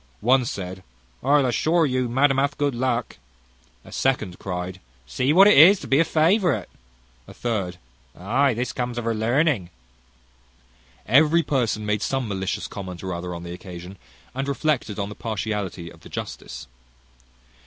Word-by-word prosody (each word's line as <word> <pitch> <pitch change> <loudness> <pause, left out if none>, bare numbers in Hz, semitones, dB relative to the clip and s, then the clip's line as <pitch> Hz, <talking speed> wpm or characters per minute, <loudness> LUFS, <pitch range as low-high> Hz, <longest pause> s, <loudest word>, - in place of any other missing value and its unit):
One 125 +3 +3
said, 95 -3 -5 0.4
"I'll 140 +1 +3
assure 160 +7 +2
you, 130 -3 0
madam 135 +2 +3
hath 140 +1 +1
had - - -28
good 145 -2 0
luck." 120 -1 -2 0.7
A - - -13
second 110 -9 -1
cryed, 90 0 -5 0.3
"See 125 - 0
what 190 +5 +7
it 210 - +7
is 180 +7 +8
to - - -8
be 135 - +3
a - - +6
favourite!" 165 +2 +2 0.6
A - - -13
third, 100 -7 -2 0.4
"Ay, 125 +7 +1
this 125 +2 -3
comes 120 -1 -3
of 120 - -3
her 115 - +1
learning." 115 - +1 1.4
Every 155 +5 +4
person 115 -7 -1
made 105 0 0
some 135 -1 -1
malicious 95 -2 -3
comment 95 -3 -7
or 95 -1 -3
other 90 0 -5
on 85 - -7
the 85 0 -7
occasion, 90 +1 -10 0.3
and 135 +2 -3
reflected 140 -6 -1
on 100 -1 -3
the - - -7
partiality 105 -6 -4
of - - -16
the - - -14
justice. 65 +1 -7
120 Hz, 165 wpm, -23 LUFS, 95-140 Hz, 1.4 s, is